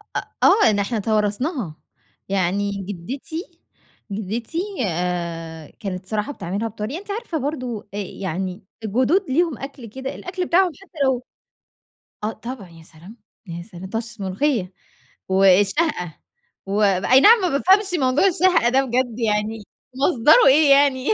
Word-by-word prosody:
آآ، - - 0 0.2
آه 410 - +6
إن 205 -1 +1
إحنا 210 +3 -1
توارثناها 215 - -1 0.5
يعني 195 +1 0
جدتي 260 - -7 0.5
جدتي 220 - -4 0.3
آآ 170 -2 -4
كانت 190 -4 -5
صراحة 210 +6 -2
بتعملها 200 +2 -3
بطريقة، 225 - -5
أنتِ 405 0 -8
عارفة 400 -6 -3
برضه 255 -7 -4
آآ - - -5
يعني 190 0 -4 0.2
الجدود 260 - +1
ليهم 320 0 +1
أكل 275 -3 -8
كده 265 +5 -6
الأكل 360 0 -4
بتاعهم 360 +1 +3
حتى 360 -4 -20
لو 260 -2 +1 1.0
آه 215 - 0
طبعًا 235 -7 -8
يا 165 -1 -15
سلام! 175 +8 -15 0.3
يا 170 0 -6
سلام! 185 -2 -10
طشّة 225 -1 -5
ملوخيّة 190 0 -1 0.6
والشهقة 195 - +2 0.5
وأي 200 +4 +3
نعم 445 - +7
ما 365 - +1
بافهمش 380 +6 +3
موضوع 260 +6 +2
الشهقة 360 -8 +3
ده 265 +2 +3
بجد 245 -2 -1
يعني 215 -1 -1 0.3
مصدره 290 - +5
إيه 285 +1 +6
يعني. 275 -1 +4
225 Hz, 135 wpm, -22 LUFS, 195-285 Hz, 1.0 s, نعم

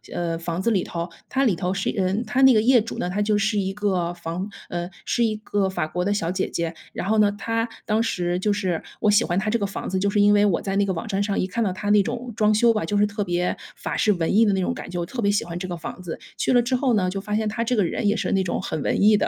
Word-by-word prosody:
呃， 170 -1 -1
房 170 +1 -3
子 230 +4 +1
里 190 -4 +2
头， 170 0 -4 0.2
它 270 0 +1
里 210 -7 +3
头 180 +1 -2
是 195 0 -1
嗯， 195 +3 0
它 260 - 0
那 265 -2 +7
个 215 - +5
业 245 -1 +5
主 230 - -6
呢， - - -2
她 195 +3 -1
就 210 0 +2
是 210 0 +1
一 190 0 -1
个 190 -5 0
房 175 +3 -5 0.2
呃， 175 0 -3 0.2
是 240 - +1
一 220 -2 +1
个 205 -2 -1
法 175 -4 -2
国 180 +2 -2
的 200 - 0
小 180 -4 0
姐 185 - -1
姐。 170 0 -2 0.2
然 - - -4
后 220 +1 +2
呢 205 -1 +5
她 225 +3 -2 0.2
当 215 +1 +1
时 180 -6 -1
就 210 +3 +1
是 190 -5 -1 0.2
我 210 - +4
喜 210 +3 +5
欢 175 0 -1
她 195 - -1
这 235 - +1
个 200 - 0
房 195 - -5
子， 190 - -1
就 200 +1 +1
是 205 - +1
因 205 0 +6
为 205 0 +4
我 195 -5 +2
在 195 -1 -3
那 200 - +3
个 - - +1
网 170 +3 -4
站 200 -2 -1
上 200 -1 0
一 - - +1
看 215 +5 -1
到 195 - 0
她 205 +3 -2
那 210 -1 +6
种 240 +3 -4
装 215 -1 +3
修 230 +2 +4
吧， 215 - -1
就 205 +6 -1
是 205 - +4
特 205 0 -2
别 175 -1 -1 0.2
法 - - -4
式 215 - +3
文 175 0 0
艺 225 - +6
的 205 - +3
那 190 - 0
种 180 - 0
感 - - -8
觉， 180 - -5
我 170 - -1
特 235 +7 -5
别 200 - +2
喜 205 - 0
欢 170 0 -5
这 185 - -4
个 175 -1 -4
房 170 - -7
子。 175 -3 -6 0.2
去 - - 0
了 245 -1 +5
之 255 +2 0
后 255 -2 +2
呢， 185 -3 +1
就 195 +1 -4
发 210 +1 -3
现 215 0 0
她 220 +2 -1
这 245 +2 0
个 210 - +3
人 205 +5 -1
也 205 - +3
是 - - -2
那 195 -1 +2
种 175 - -2
很 155 - -3
文 - - 0
艺 210 +1 +7
的， - - +1
200 Hz, 345 characters per minute, -23 LUFS, 180-215 Hz, 0.2 s, 那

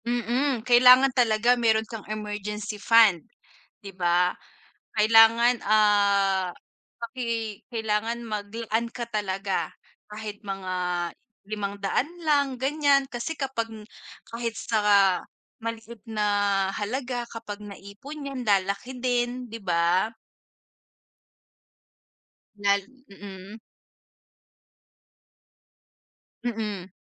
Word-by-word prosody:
Mm, 240 +1 0
kailangan 250 +2 +7
talaga 235 -1 +3
meron 225 -2 +2
kang 225 -1 -8
emergency 210 0 -5
fund, 220 -6 +5 0.6
'di 200 - -8
ba? 175 0 +3 0.6
Kailangan, 225 +2 +5
ah, 200 -3 +3 0.5
paki 230 -4 -4
kailangan 225 +1 -1
maglaan 225 +1 -3
ka 235 - -4
talaga 195 -2 -2 0.4
kahit 210 -1 -7
mga 195 -2 -4 0.8
500 200 +4 -2
lang, 285 -4 +2
ganyan. 280 -1 +3
Kasi 240 +7 -4
kapag 260 -5 -3
n 215 - -10 0.5
kahit 230 0 -3
sa 225 - -1 0.8
maliit 230 -1 -6
na 215 -2 -1 0.5
halaga 245 +3 -3
kapag 220 -3 -7
naipon 205 +9 -10
yan, 265 -2 -5
lalaki 200 +5 0
din, 245 0 -1
'di 230 - -6
ba? 175 +4 +1 2.4
Lal 200 0 +2 0.3
mm. 200 +1 -11 2.8
Mm. 210 -6 -4
220 Hz, 85 wpm, -26 LUFS, 205-240 Hz, 2.8 s, kailangan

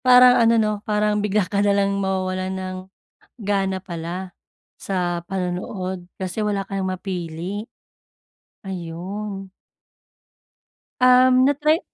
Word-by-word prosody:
parang 250 -1 +8
ano 230 0 +5
'no, 215 -1 +2 0.2
parang 210 0 +2
bigla 210 0 +1
ka 200 0 0
na 205 0 +3
lang 200 0 +1
mawawalan 185 -1 -1
ng 185 0 -4 0.7
gana 195 -1 0
pala 180 +1 -5 0.5
sa 175 -3 -1
panonood 185 0 -3
kasi 190 +3 -3
wala 205 -2 0
ka 195 - -4
ng 190 - -1
mapili, 185 +2 -4 1.0
ayun. 190 +3 -5 1.5
Um, 255 0 +6
natry 300 +3 +3
195 Hz, 110 wpm, -22 LUFS, 185-210 Hz, 1.5 s, parang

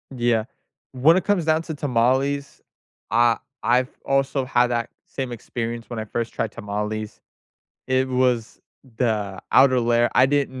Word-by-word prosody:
Yeah. 120 -3 +1 0.5
When 145 +6 +5
it 185 - 0
comes 200 -5 +1
down 160 0 +2
to 160 - -5
tamales, 140 +1 0 0.5
I 120 0 +4 0.3
I've 125 +2 +2 0.2
also 135 -1 +1
had 125 -1 +3
that 120 -1 -2 0.2
same 130 -3 -5
experience 115 0 -5
when 120 -2 -5
I 110 - -4
first 115 +2 -4
tried 110 - -2
tamales. 105 +1 -5 0.7
It 130 0 +1
was 125 -3 0 0.4
the 105 -5 -1
outer 130 -2 +6
layer, 120 0 +2
I 130 - +6
didn't 135 -2 -1
125 Hz, 145 wpm, -23 LUFS, 115-135 Hz, 0.7 s, outer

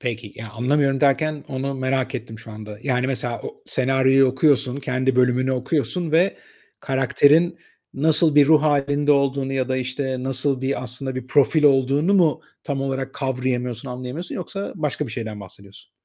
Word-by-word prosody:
Peki, 120 -5 -5
ya, 110 0 -8
"Anlamıyorum." 135 +3 +1
derken 150 +1 +1
onu 135 +1 -3
merak 130 0 -1
ettim 110 -1 -6
şu 115 0 -11
anda. 105 -1 -9
Yani 130 -2 0
mesela 125 -3 -2
o 440 0 -9
senaryoyu 135 +1 +3
okuyorsun, 130 -1 +2
kendi 130 -1 -1
bölümünü 125 +1 +2
okuyorsun 150 +6 -2
ve 175 +5 +3 0.4
karakterin 145 +5 +2 0.4
nasıl 155 +1 +2
bir 145 -1 +6
ruh 155 0 +5
hâlinde 145 0 +2
olduğunu 140 -1 0
ya 130 -1 -1
da, 130 - 0
işte, 130 0 -3
nasıl 135 0 -1
bir 135 0 -2
aslında 130 +2 -3
bir 130 -1 -6
profil 145 +3 +3
olduğunu 140 +6 +3
mu 170 -6 +3 0.2
tam 140 -3 -3
olarak 135 -1 -3
kavrayamıyorsun, 130 -1 -3
anlayamıyorsun 125 +7 -6
yoksa 195 +2 -5
başka 150 -3 -2
bir - - -8
şeyden 110 -4 -6
bahsediyorsun? 100 +1 -13
135 Hz, 160 wpm, -22 LUFS, 125-145 Hz, 0.4 s, bir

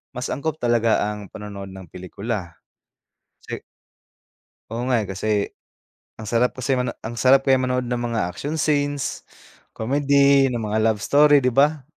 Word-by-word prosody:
mas 125 +1 -4
angkop 155 +3 -3
talaga 115 -2 +2
ang 105 -1 -8
panonood 100 -2 -8
ng 95 -1 -11
pelikula. 95 -1 -5 0.9
Kasi - - -7 1.1
oo 115 +2 -4
nga, 125 -3 +2
eh, 105 - -5
kasi 95 +3 -3 0.9
ang 110 - -8
sarap 120 +3 +2
kasi 130 +2 0
mano 125 0 -1
ang 115 +1 -5
sarap 135 +1 +5
kaya 135 - +6
manood 125 -1 -1
ng 125 - -1
mga 115 -1 -1
action 145 - -5
scenes, 145 -2 -1 0.5
comedy, 140 +2 +3
ng 120 - -2
mga 110 0 -1
love 110 -2 +2
story 145 0 +5
di 125 -1 +1
ba? 145 +1 +3
125 Hz, 155 wpm, -22 LUFS, 110-140 Hz, 1.1 s, kaya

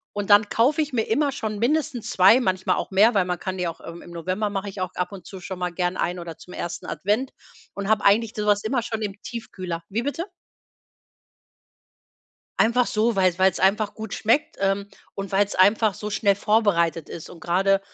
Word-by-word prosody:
und 205 0 -3
dann 205 +1 +6
kaufe 280 +7 +2
ich 290 - -9
mir 225 -2 +1
immer 280 +5 +2
schon 220 -5 -4
mindestens 250 0 -1
2, 190 +7 +6
manchmal 185 -5 0
auch - - -4
mehr, 210 +4 +5
weil 185 -2 +3
man 180 -1 -3
kann 185 -1 -4
die 180 -1 -1
auch 165 - -6
im 170 +1 -9
im 175 - -12
November 185 +5 -2
mache 200 0 -3
ich 195 - -9
auch 185 0 -2
ab 180 +2 -2
und 195 -2 -10
zu 190 - -9
schon 190 0 -6
mal 180 -1 -2
gern 180 +1 -2
eine 175 0 -2
oder 165 -2 -8
zum 180 - -13
1. 170 - -5
Advent 210 - -1 0.4
und 200 +1 -4
habe 220 -1 +2
eigentlich 215 +3 +4
so 210 -1 -2
was 205 0 +2
immer 240 +1 0
schon 225 -1 -4
im 205 -1 -4
Tiefkühler. 185 -8 -6
Wie 225 +4 -2
bitte? 330 +5 -3 2.3
Einfach 240 +2 +3
so, 220 0 +1
weil 185 -2 +2
weil's 190 -1 +3
einfach 205 +2 +2
gut 220 -2 -7
schmeckt, 230 +7 +1
ähm, 200 +1 0 0.3
und 195 0 -6
weil's 200 +1 +2
einfach 205 +2 +4
so 210 0 -6
schnell 200 -1 +2
vorbereitet 195 -7 +1
ist. 165 - -8
Und 170 -2 -12
gerade, 195 +3 +2
200 Hz, 205 wpm, -24 LUFS, 185-220 Hz, 2.3 s, dann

